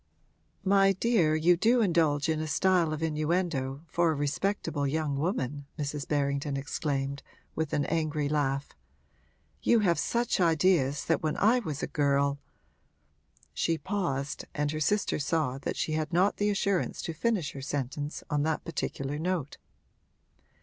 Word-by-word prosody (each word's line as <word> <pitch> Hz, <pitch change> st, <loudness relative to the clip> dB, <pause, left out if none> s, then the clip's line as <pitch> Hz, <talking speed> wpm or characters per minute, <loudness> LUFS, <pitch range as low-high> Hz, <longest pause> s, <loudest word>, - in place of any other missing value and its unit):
'My 195 Hz, 0 st, +4 dB
dear, 190 Hz, -6 st, +2 dB
you 170 Hz, +3 st, +4 dB
do 230 Hz, +8 st, +3 dB
indulge 160 Hz, -7 st, +2 dB
in 160 Hz, -1 st, 0 dB
a 155 Hz, -, -3 dB
style 175 Hz, +1 st, +2 dB
of 155 Hz, +1 st, -3 dB
innuendo, 155 Hz, -3 st, -1 dB
for 170 Hz, +1 st, +2 dB
a -, -, -1 dB
respectable 145 Hz, 0 st, -1 dB
young 150 Hz, 0 st, -1 dB
woman!' 145 Hz, -, -2 dB
Mrs. 145 Hz, -1 st, -3 dB
Berrington 140 Hz, -1 st, 0 dB
exclaimed, 140 Hz, -1 st, -2 dB, 0.3 s
with 160 Hz, -1 st, -2 dB
an 145 Hz, -, +1 dB
angry 155 Hz, -2 st, 0 dB
laugh. 140 Hz, -1 st, 0 dB, 0.9 s
'You 235 Hz, -2 st, +4 dB
have 170 Hz, -6 st, +2 dB, 0.4 s
ideas 165 Hz, -5 st, +2 dB
that 165 Hz, -, +1 dB
when 155 Hz, -1 st, -1 dB
I 230 Hz, +5 st, +4 dB
was 155 Hz, -, -5 dB
a -, -, 0 dB
girl 140 Hz, -1 st, +1 dB, 0.6 s
' -, -, -36 dB
She 165 Hz, -1 st, +2 dB
paused, 155 Hz, -8 st, -2 dB
and 150 Hz, 0 st, 0 dB
her 155 Hz, -, -3 dB
sister 200 Hz, +6 st, +1 dB
saw 145 Hz, -3 st, 0 dB
that -, -, -4 dB
she -, -, -1 dB
had 155 Hz, 0 st, -1 dB
not 185 Hz, +4 st, +2 dB
the 205 Hz, 0 st, +1 dB
assurance 200 Hz, -2 st, 0 dB
to 165 Hz, -, -3 dB
finish 195 Hz, -3 st, 0 dB
her 135 Hz, -, -8 dB
sentence 145 Hz, +1 st, -4 dB
on 145 Hz, -2 st, 0 dB
that 155 Hz, +1 st, -1 dB
particular 145 Hz, -3 st, -3 dB
note. 170 Hz, -4 st, -2 dB
155 Hz, 150 wpm, -29 LUFS, 145-175 Hz, 0.9 s, My